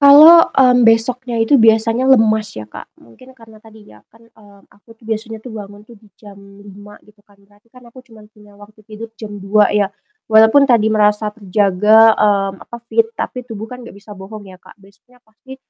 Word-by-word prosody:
Kalau, 305 +4 +6
mmm, 250 -2 +2
besoknya 230 +1 0
itu 250 +5 +2
biasanya 225 +2 +1
lemas 220 -5 +1
ya, 110 -1 -11
Kak. - - -12 0.2
Mungkin 255 - -20
karena 225 -3 -19
tadi 220 -1 -19
ya 105 0 -21
kan, 230 0 -24
eee, 205 -3 -22
aku 215 +3 -22
tuh 225 0 -21
biasanya 220 0 -6
bangun 210 -2 -12
tuh 235 - -16
di 205 -2 -25
jam 205 -2 -15
5:00 200 +1 -17
gitu 210 -1 -27
kan, 200 -1 -28
berarti 205 +4 -30
kan 250 - -18
aku 255 +2 -18
cuma 225 -4 -19
punya 210 -1 -22
waktu 215 +1 -19
tidur 220 +2 -11
jam 205 -2 -10
2:00 205 +2 0
ya, 205 -2 0 0.4
walaupun 220 +6 +4
tadi 220 -3 +1
merasa 210 0 0
terjaga, 210 +2 +2
mmm, 195 -2 -1
apa 235 - -9
fit 450 - -1
tapi 250 - -6
tubuh 220 -1 -8
kan 250 - -11
nggak - - -16
bisa 205 +1 -15
bohong 205 +2 -12
ya, 185 -1 -16
Kak. - - -19
Besoknya 200 +5 -25
pasti 245 +5 -16
215 Hz, 195 wpm, -15 LUFS, 205-230 Hz, 0.4 s, Kalau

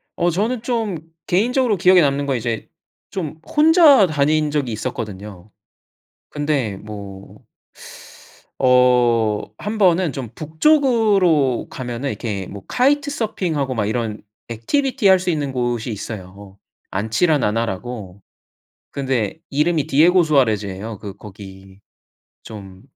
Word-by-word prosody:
어. 175 - +1
저는 220 +7 -1
좀 225 -6 -2 0.3
개인적으로 235 +3 +1
기억에 180 0 +5
남는 140 -1 +1
건 135 -3 0
이제 115 -1 -4 0.4
좀 160 -5 -5
혼자 300 - +5
다닌 150 0 +1
적이 145 -5 -1
있었거든요. 105 -4 -6 0.8
근데 145 -9 -2
뭐 100 -2 -10 1.2
어 125 -4 +3 0.2
한번은 185 -6 +1
좀 130 -4 -6
북쪽으로 190 - +2
가면은 125 +1 -5
이렇게 100 -8 -4
뭐 100 -1 -10
카이트 285 +3 +1
서핑하고 165 - -2
막 105 -3 0
이런 110 -1 -3 0.3
activity 210 - 0
할 190 - +5
수 180 - -3
있는 150 -5 -1
곳이 120 -2 -2
있어요. 100 -2 -8 0.3
안치라나나라고. 110 - -1 0.7
근데 130 -3 -2
이름이 150 +1 +1
디에고수아레즈예요. 125 - +2
이 100 - -5
거기 95 -2 -13 0.6
좀 95 -3 -11
135 Hz, 260 characters per minute, -20 LUFS, 110-180 Hz, 1.2 s, 기억에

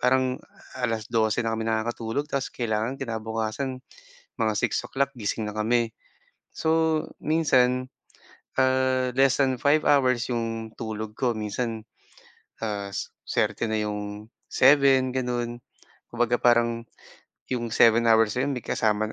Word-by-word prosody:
parang 130 0 +2 0.4
12:00 115 -1 0
na 115 - 0
kami 110 0 -2
nakakatulog 115 +3 -1
tapos 140 -1 -1
kailangan 115 +1 -1
kinabukasan 115 +1 -3 0.6
mga 110 -1 +2
6:00 135 +5 -1
gising 110 -2 -3
na 105 - -5
kami. 115 +2 +1 0.6
So 160 -1 +1 0.2
minsan, 130 -5 +2 0.7
ah, 130 -1 +2
less 135 +1 +4
than 130 -2 +2
5 145 +3 +2
hours 130 -4 +3
'yong 115 -2 -3
tulog 110 -1 -5
ko 125 -3 +1
minsan, 110 +1 -4 0.8
ah, 100 -2 -3 0.4
suwerte 115 - 0
na 110 - 0
'yong 105 +1 -6 0.2
7, 135 -1 +5
ganon. 120 -2 -2 0.5
Kumbaga 120 0 +1
parang 115 -1 +2 0.7
'yong 120 -2 -2
7 115 0 +5
hours 110 -1 +4
na 125 - +1
'yon 140 - -1
may - - -3
kasama 110 -1 0
120 Hz, 120 wpm, -26 LUFS, 110-130 Hz, 0.8 s, 7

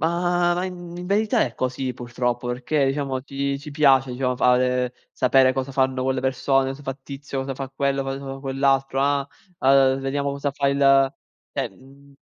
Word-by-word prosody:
Ma 175 +2 +1
i - - -2
in 175 -1 -8
verità 210 +2 +2
è 120 - -3
così 130 0 -2
purtroppo, 120 0 -3
perché, 130 +4 0
diciamo, 135 -1 -1
ci 140 +1 -3
ci 150 +1 -9
piace, 135 -3 +4
diciamo, 125 0 -1
fare, 125 0 +2 0.2
sapere 130 0 +4
cosa 135 +1 -3
fanno 130 -1 +1
quelle 130 0 0
persone, 135 +1 +1
cosa 140 +2 -8
fa 135 -1 -4
tizio, 140 -1 -6
cosa 135 0 -4
fa 135 0 -5
quello, 135 0 -1
cosa 135 0 -4
fa 135 -1 -7
quell'altro, 135 0 +1
ah, 140 0 +1 0.3
uhm, 135 0 +4
vediamo 140 +1 -1
cosa 140 0 -2
fa 140 -1 0
il 135 -1 +4 0.4
cioè - - -2
mhmm 140 +1 -19
135 Hz, 175 wpm, -23 LUFS, 130-140 Hz, 0.4 s, piace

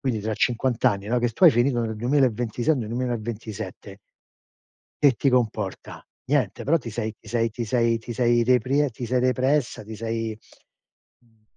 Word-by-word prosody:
Quindi 120 -6 -1
tra 110 +1 -2
50 120 +1 0
anni, 100 0 +2
no, 125 +1 +2
che 120 -1 0
tu 145 - +1
hai 170 - +10
finito 120 -1 +1
nel 110 -1 -3
2026, 120 +1 +1
o - - -4
nel 110 -4 -4
2027 110 -4 -5 1.0
che 140 -2 +7
ti 135 +4 0
comporta? 110 -6 -2 0.2
Niente, 130 -8 0
però 165 +4 +3
ti 120 -4 -8
sei 110 -1 -4
ti 110 - -16
sei 115 0 0
ti 115 +2 -4
sei 115 0 +2
ti 120 +1 -7
sei 120 -1 +3
reprie 130 +4 +2
ti 120 +2 -7
sei 125 +1 +1
repressa, 130 0 +1
ti 110 +1 -8
sei, 115 0 -3 0.9
uhm, 115 -2 -31
120 Hz, 175 wpm, -24 LUFS, 110-125 Hz, 1.0 s, hai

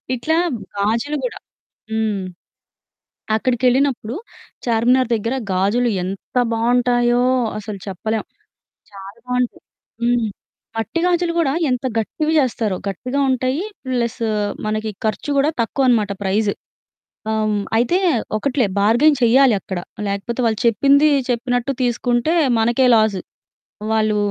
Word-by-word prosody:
ఇట్లా 310 +6 0 0.4
గాజులు 230 +9 0
గూడా. 250 - -3 0.6
హ్మ్. 220 -3 0 1.1
అక్కడికెళ్ళినప్పుడు 250 0 +1 0.5
చార్మినార్ 240 +2 +3
దగ్గర 230 +3 -1 0.2
గాజులు 205 +7 +2
ఎంత 190 +6 -7 0.2
బావుంటాయో 240 +1 +2 0.4
అసలు 210 -1 -6
చెప్పలేం. 215 +3 -3 0.7
చాలా 195 +2 -11
బావుంటాయి. 250 -1 -1 0.4
హ్మ్. 240 -1 +2 0.5
మట్టి 225 +8 -2
గాజులు 350 -1 +1
గూడా 280 -5 +2 0.2
ఎంత 250 0 -1
గట్టివి 305 +8 -1
జేస్తారో. 230 -7 0
గట్టిగా 250 +8 -3
ఉంటాయి. 260 +5 0 0.3
ప్లస్ 235 -2 -1 0.5
మనకి 215 +1 -2 0.2
ఖర్చు 215 +6 -2
గూడా 280 +2 +3
తక్కువనమాట 230 -3 +1
ప్రైస్. 200 +2 +1 0.8
ఆహ్, 220 - 0
హ్మ్. 205 -1 0
అయితే 245 +10 +2 0.4
ఒకటిలే 255 +1 +1
బార్గెయిన్ 240 +9 +4
చెయ్యాలి 245 +1 +5
అక్కడ. 190 0 -5 0.3
లేకపోతే 200 +5 -3
వాళ్ళు 220 -2 0
చెప్పింది 280 +6 +4 0.2
చెప్పినట్టు 245 +2 0
తీసుకుంటే 245 +4 +1 0.2
మనకే 235 +3 +3
లాస్. 215 -3 +2 0.7
వాళ్ళు 215 -1 +2
235 Hz, 110 wpm, -20 LUFS, 215-255 Hz, 1.1 s, చెయ్యాలి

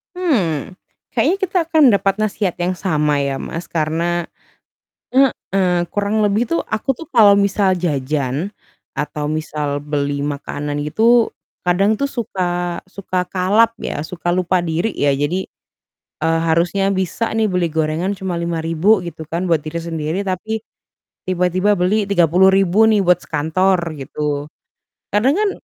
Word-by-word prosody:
Mmm, 195 - -1 0.3
kayaknya 385 - +1
kita 380 -1 0
akan 315 -5 +5
dapat 200 0 +1
nasihat 205 -3 0
yang 180 +1 -1
sama 150 -6 +1
ya 140 -1 -1
Mas 165 +2 -5
karena, 165 +2 -1 0.8
heeh, 190 -9 +1
kurang 205 +3 0
lebih 210 +2 +2
tuh 335 - +2
aku 220 +5 0
tuh 325 +6 -11
kalau 215 - +6
misal 200 -1 +2
jajan, 150 0 -1 0.4
atau 150 0 -4
misal 150 -1 -2
beli 145 -1 -2
makanan 145 0 -4
itu, 230 +8 +3 0.3
kadang 195 +4 +2
tuh 280 - -1
suka 175 -6 -2
suka 185 -1 -3
kalap 205 +5 +3
ya 145 - -4
suka 175 +1 -6
lupa 185 0 +1
diri 170 +6 -1
ya 145 - 0
jadi, 165 +7 -1 0.7
eee, 165 0 +2
harusnya 180 +4 +1
bisa 190 +4 -1
nih 220 -1 +1
beli 175 -4 -1
gorengan 160 +5 0
cuma 185 -3 -4
Rp5.000 170 +4 +1
gitu 165 -2 -7
kan 170 +4 -3
buat 160 -2 +1
diri 165 +2 -4
sendiri 165 +2 -3
tapi, 200 +3 -3 0.7
tiba-tiba 185 +3 +2
beli 200 +3 +1
Rp30.000 190 +3 +4
nih 210 -3 +3
buat 180 -1 +4
sekantor 175 +3 0
gitu, 145 +1 -3 0.6
kadang 245 - +3
kan 420 0 +2
180 Hz, 140 wpm, -19 LUFS, 160-200 Hz, 0.8 s, kalau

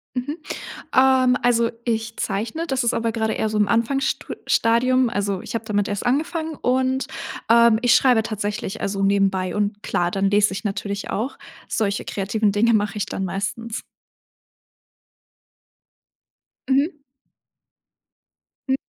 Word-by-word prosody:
Mhm. 270 +5 -3 0.6
Ähm, 260 -1 +5
also, 235 -1 +2
ich 225 -1 -2
zeichne, 220 +12 -2
das 265 -4 0
ist 235 - +1
aber 230 0 0
grade 220 -1 -1
eher 220 - -1
so 215 - -2
im 210 -1 +3
Anfangsstu 235 +5 0
Stadium. 255 +2 +3
Also, 200 -4 -2
ich - - -7
habe 230 - -3
damit 205 -2 0
erst 205 +2 -3
angefangen 315 +5 0
und, 260 +1 +1 0.4
ähm, 235 -1 +6
ich 245 -1 +5
schreibe 250 -4 +4
tatsächlich, 215 0 -4
also, 195 0 -2
nebenbei 195 -2 +1
und 205 0 -1
klar, 175 -4 0
dann 195 +1 +1
lese 205 0 +3
ich 195 - -5
natürlich 200 -1 -3
auch, 240 +7 -3 0.3
solche 205 -2 -1
kreativen 205 +1 0
Dinge 225 +4 +3
mache 210 0 +1
ich 205 - -1
dann 190 - -3
meistens. 210 +4 -4 2.9
Mhm. 285 +3 +1 1.7
M 265 - +4
225 Hz, 135 wpm, -22 LUFS, 205-250 Hz, 2.9 s, ähm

